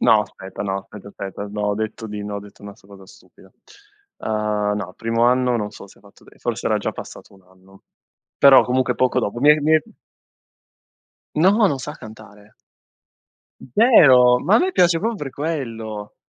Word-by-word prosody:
No, 110 Hz, -, +4 dB
aspetta, 95 Hz, -2 st, -8 dB
no, 95 Hz, -1 st, -2 dB
aspetta, 100 Hz, +1 st, -12 dB
aspetta. 100 Hz, 0 st, -8 dB
No, 105 Hz, 0 st, -5 dB
ho 105 Hz, 0 st, 0 dB
detto 110 Hz, +1 st, -5 dB
di 105 Hz, -1 st, -7 dB
no, 105 Hz, -, -6 dB
ho -, -, -4 dB
detto 100 Hz, 0 st, -16 dB
una 100 Hz, -1 st, -10 dB
s -, -, -26 dB
una 100 Hz, +1 st, -16 dB
cosa 95 Hz, -1 st, -16 dB
stupida. -, -, -20 dB, 0.7 s
Uhm, 105 Hz, -1 st, -2 dB
no, 95 Hz, -3 st, -6 dB
primo 115 Hz, +1 st, 0 dB
anno 125 Hz, 0 st, +2 dB
non 105 Hz, -2 st, -4 dB
so 100 Hz, -, -13 dB
se 95 Hz, -, -21 dB
fatto 100 Hz, 0 st, -21 dB
dei -, -, -20 dB
forse -, -, -3 dB
era -, -, +1 dB
già -, -, -3 dB
passato -, -, -11 dB
un 95 Hz, -, -21 dB
anno, 95 Hz, +1 st, -23 dB, 0.5 s
però 140 Hz, -1 st, +7 dB
comunque 130 Hz, 0 st, 0 dB
poco 130 Hz, -1 st, +1 dB
dopo. 120 Hz, +4 st, -4 dB
Mi 145 Hz, -, +6 dB
è 150 Hz, 0 st, +4 dB
mi 155 Hz, +2 st, +1 dB
è 155 Hz, -, +3 dB, 1.5 s
No! 200 Hz, +7 st, +4 dB
Non 140 Hz, -8 st, -1 dB
sa 150 Hz, +3 st, -7 dB
cantare! 110 Hz, -5 st, -15 dB, 1.1 s
Zero! 130 Hz, -, +5 dB
Ma 170 Hz, +11 st, +1 dB
a -, -, +6 dB
me 375 Hz, +1 st, +1 dB
piace 175 Hz, -, +3 dB
proprio 230 Hz, +2 st, -2 dB
per 145 Hz, -8 st, -6 dB
quello! 115 Hz, -9 st, -5 dB
110 Hz, 190 wpm, -20 LUFS, 105-140 Hz, 1.5 s, però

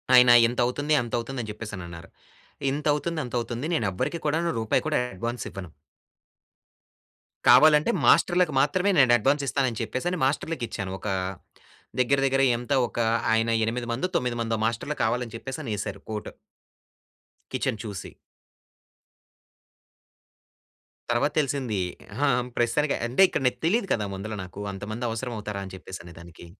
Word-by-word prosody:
ఆయన 125 Hz, -1 st, +8 dB, 0.2 s
ఇంతవుతుంది, 125 Hz, +5 st, 0 dB
అంతవుతుందని 120 Hz, 0 st, -3 dB
చెప్పేసనన్నారు. 95 Hz, -6 st, -8 dB, 0.6 s
ఇంతవుతుంది, 150 Hz, +3 st, 0 dB
అంతవుతుంది 120 Hz, +2 st, -3 dB
నేనెవ్వరికి 125 Hz, -, -1 dB
కూడానూ 165 Hz, +3 st, +1 dB
రూపాయి 110 Hz, -, +1 dB
కూడా 155 Hz, -, +2 dB, 0.2 s
అడ్వాన్సివ్వను. 95 Hz, -4 st, -5 dB, 1.8 s
కావాలంటే, 150 Hz, -, +7 dB, 0.2 s
మాస్టర్‌లకు 175 Hz, -4 st, +4 dB
మాత్రమే 180 Hz, +8 st, +2 dB
నేనడ్వాన్సిస్తానని 130 Hz, 0 st, +3 dB
చెప్పే‌సని 175 Hz, +8 st, -2 dB
మాస్టర్‌లకిచ్చాను, 125 Hz, -, -2 dB
ఒకా 105 Hz, -, -2 dB, 0.9 s
దెగ్గిర, 135 Hz, +2 st, +3 dB
దెగ్గిర 135 Hz, 0 st, +2 dB
ఎంత 125 Hz, +4 st, -3 dB
ఒకా, 115 Hz, 0 st, -1 dB, 0.3 s
ఆయన 115 Hz, +1 st, +2 dB, 0.2 s
ఎనిమిది 120 Hz, +2 st, -3 dB
మందో, 130 Hz, +10 st, -1 dB
తొమ్మిది 125 Hz, -1 st, -2 dB
మందో 115 Hz, -1 st, -1 dB
మాస్టర్లు 115 Hz, +6 st, -2 dB
కావాలని 120 Hz, +1 st, -1 dB
చెప్పేస‌నేశారు 110 Hz, -7 st, -5 dB
కోట్. 105 Hz, -1 st, -4 dB, 1.2 s
కిచెన్ 110 Hz, -, -1 dB
చూసి. 100 Hz, -4 st, -7 dB, 3.0 s
తర్వాత 135 Hz, +5 st, +2 dB
తెలిసిందీ. 135 Hz, -8 st, -1 dB, 0.3 s
అహా! 140 Hz, +6 st, +1 dB, 0.3 s
ప్రస్తుతానికి 130 Hz, +5 st, +1 dB
అంటే, 125 Hz, +9 st, +1 dB
ఇక్కడ 180 Hz, -, -2 dB
నాకు -, -, -1 dB
తెలీదు 195 Hz, +5 st, +2 dB
కదా! 105 Hz, -, -1 dB
ముందల 100 Hz, +3 st, -5 dB
నాకు 95 Hz, +2 st, -10 dB
అంతమందవసరమవుతారా 110 Hz, 0 st, -4 dB
అని 95 Hz, -, -10 dB
చెప్పేసనేదానికి. 85 Hz, -2 st, -11 dB
120 Hz, 105 wpm, -26 LUFS, 110-145 Hz, 3.0 s, ఆయన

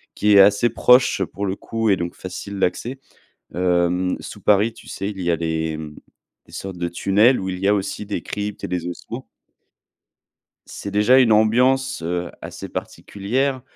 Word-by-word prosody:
qui 105 Hz, 0 st, +3 dB
est 100 Hz, -, +8 dB
assez 100 Hz, +4 st, +4 dB
proche 125 Hz, +3 st, +4 dB
pour 100 Hz, -, -5 dB
le 95 Hz, -1 st, -2 dB
coup 115 Hz, +2 st, -2 dB
et 100 Hz, -, +5 dB
donc 85 Hz, 0 st, -4 dB
facile 95 Hz, +2 st, -7 dB
d'accès- 120 Hz, +8 st, -1 dB, 0.6 s
hem, 90 Hz, 0 st, +1 dB
sous -, -, -9 dB
Paris, 105 Hz, +3 st, +3 dB
tu -, -, -16 dB
sais, 100 Hz, +1 st, -4 dB
il 100 Hz, -3 st, -7 dB
y 85 Hz, -1 st, +1 dB
a 85 Hz, -, +1 dB
des 80 Hz, -1 st, -2 dB, 0.7 s
sortes 95 Hz, -2 st, -7 dB
de 85 Hz, 0 st, -2 dB
tunnels 105 Hz, +8 st, +3 dB
où 95 Hz, -, -4 dB
il 90 Hz, -1 st, -4 dB
y 95 Hz, -, 0 dB
a 100 Hz, -, +5 dB
aussi 100 Hz, +1 st, -4 dB
des 105 Hz, -, -4 dB
cryptes 105 Hz, 0 st, -5 dB
et -, -, -2 dB
des 90 Hz, -1 st, -3 dB
ossements 90 Hz, -, -7 dB, 1.4 s
c'est 100 Hz, -, -7 dB
déjà 105 Hz, +6 st, +5 dB
une 125 Hz, -4 st, +4 dB
ambiance, 125 Hz, +4 st, +2 dB
heu, 85 Hz, +1 st, -3 dB
assez -, -, -8 dB
particulière, 130 Hz, +7 st, -3 dB
100 Hz, 175 wpm, -21 LUFS, 90-110 Hz, 1.4 s, est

